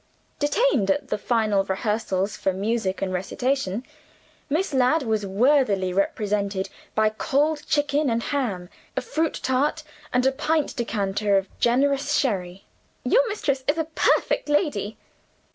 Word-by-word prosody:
Detained 290 - +2
at 195 - 0
the 210 - 0
final 215 -4 +1
rehearsals 200 0 -2
of 190 - +2
music 200 -1 -1
and 185 -1 -2
recitation, 235 +3 -1 0.7
Miss 320 +4 0
Ladd 265 +4 +3
was 220 -4 -1
worthily 205 -4 +2
represented 200 0 -1 0.3
by 215 0 +4
cold 295 +6 +1
chicken 290 -1 +1
and 230 0 0
ham, 215 -11 -2 0.3
a - - +2
fruit 320 0 -1
tart, 280 +5 +1 0.3
and 250 0 +2
a 265 - +5
pint 305 +2 0
decanter 205 -4 0
of 195 0 -3
generous 275 +4 +2
sherry. 190 -7 -1 0.4
"Your - - +3
mistress 280 -10 -1
is 295 +3 +2
a 320 - 0
perfect 305 - +2
lady!" 290 - 0
235 Hz, 135 wpm, -24 LUFS, 200-290 Hz, 0.7 s, a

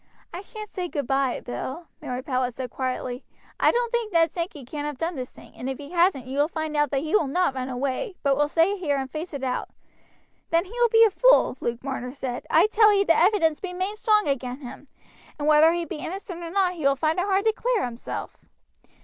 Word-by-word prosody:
"I 350 - -5
shan't 425 +1 -9
say 365 -3 -4
goodby, 275 -4 -1
Bill," 265 +7 -5 0.2
Mary 255 -3 -4
Powlett 255 -3 -1
said 255 -1 -5
quietly. 255 -1 -3 0.4
"I - - +5
don't 475 -1 0
think 470 -3 -1
Ned 330 -2 +3
Sankey 335 -6 -5
can 290 +3 -5
have 295 -2 -4
done 330 +5 -2
this 255 -2 -5
thing, - - -16
and 255 - -5
if 265 - -3
he 290 +2 -10
hasn't 345 -7 +2
you 265 +2 -4
will 295 - +4
find 315 -2 -4
that 295 -2 +1
he 300 +6 0
will 320 -9 +3
not 350 +1 +1
run 260 0 -4
away, 270 - -2
but 280 -1 +3
will 295 +1 +2
stay 335 +6 +2
here 290 -6 0
and 265 -1 -4
face 315 +5 -5
it 280 -3 -6
out." 255 -1 -2 0.8
"Then 335 +2 +2
he 385 - -14
will 480 0 +2
be 450 0 +6
a 435 - +2
fool," - - +4
Luke 235 +1 -3
Marner 260 -2 -4
said. 255 -3 -5
"I 330 +4 +5
tell 430 0 +5
ee 400 -1 +4
the 330 - +4
evidence 335 -4 +3
be 370 -2 -5
main 375 +3 -2
strong 425 -3 +2
agin 260 -1 -2
him, 275 +2 -10 0.5
and 295 0 -2
whether 305 +1 +6
he 340 0 -1
be - - -6
innocent 360 +2 -6
or 335 - -5
not 370 0 +1
he 340 - -9
will 275 0 +4
find 315 +4 0
it 360 - +1
hard 395 +1 +1
to 440 - +4
clear 475 - 0
hisself. 235 0 -6
315 Hz, 235 wpm, -25 LUFS, 270-375 Hz, 0.8 s, be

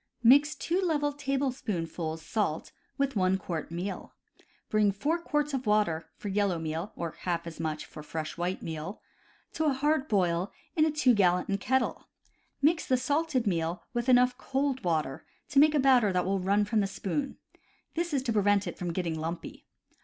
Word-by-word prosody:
— - - -39
Mix 295 +2 +3
2 340 +6 -1
level 295 -5 +1
tablespoonfuls 215 - -2
salt 200 -8 -2 0.3
with 275 -2 0
1 185 -1 +2
quart 170 -4 -4
meal. 175 +4 -5 0.5
Bring 210 -1 +3
4 290 - -1
quarts 295 -3 -1
of 260 -3 -2
water 205 -7 +1
(for 205 - -6
yellow 200 -2 +1
meal, 160 +5 -4
or 170 -1 -3
half 170 -2 -2
as 170 -2 -8
much 155 -1 -3
for - - -10
fresh 155 +1 -5
white 175 +2 -2
meal) 165 +5 -5 0.5
to 315 - -1
a 295 - +3
hard 295 +2 +1
boil 180 - +1 0.2
in 310 - +4
a 315 - +1
2 295 -4 +4
gallon 185 -1 +2
kettle. 260 +4 0 0.6
Mix 320 +2 +4
the 255 - +3
salted 285 0 0
meal 170 -3 -1
with 240 +1 -1
enough 250 0 +5
cold 270 -1 -1
water 155 -6 -1 0.3
to 275 - +4
make 305 +1 +6
a - - +4
batter 255 -6 +5
that 180 -1 +1
will 195 +1 0
run 200 +3 +2
from 220 +1 +1
the 200 - +2
spoon; 235 +8 -3 0.6
this 340 +1 -1
is 275 -3 0
to 235 -4 0
prevent 205 -1 +3
it - - -6
from 175 -2 -3
getting 165 -3 -2
lumpy. 165 +2 -6
210 Hz, 185 wpm, -29 LUFS, 175-275 Hz, 0.6 s, make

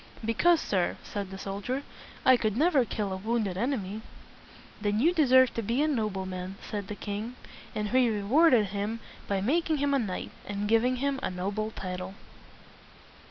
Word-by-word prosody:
"Because, 325 +10 +4
sir," 185 - 0
said 200 -2 -5
the 190 - -7
soldier, 200 +8 -3 0.4
"I 260 - +8
could 215 -3 0
never 295 -4 +4
kill 205 -3 -2
a - - -3
wounded 215 -2 -1
enemy." 215 -2 -2 0.8
"Then 205 0 +1
you 330 +8 +4
deserve 260 -6 +5
to 230 - -2
be 235 +7 +1
a - - +2
no 230 -8 +1
ble 190 -1 -4
man," 185 0 -5
said 205 -3 -4
the 210 - -5
king. 210 +4 -5 0.4
And 210 -1 -1
he 255 0 +4
re 210 -2 -2
ward 285 +7 +5
ed 215 -3 +4
him 205 +3 -3 0.3
by 195 -1 0
making 315 - +1
him 285 0 +1
a 275 - +3
knight, 200 -6 -3 0.2
and 205 0 -2
giving 230 +4 +3
him 275 +1 -1
a - - -1
noble 200 +4 -2
title. 185 -2 -6
215 Hz, 185 wpm, -29 LUFS, 200-260 Hz, 0.8 s, I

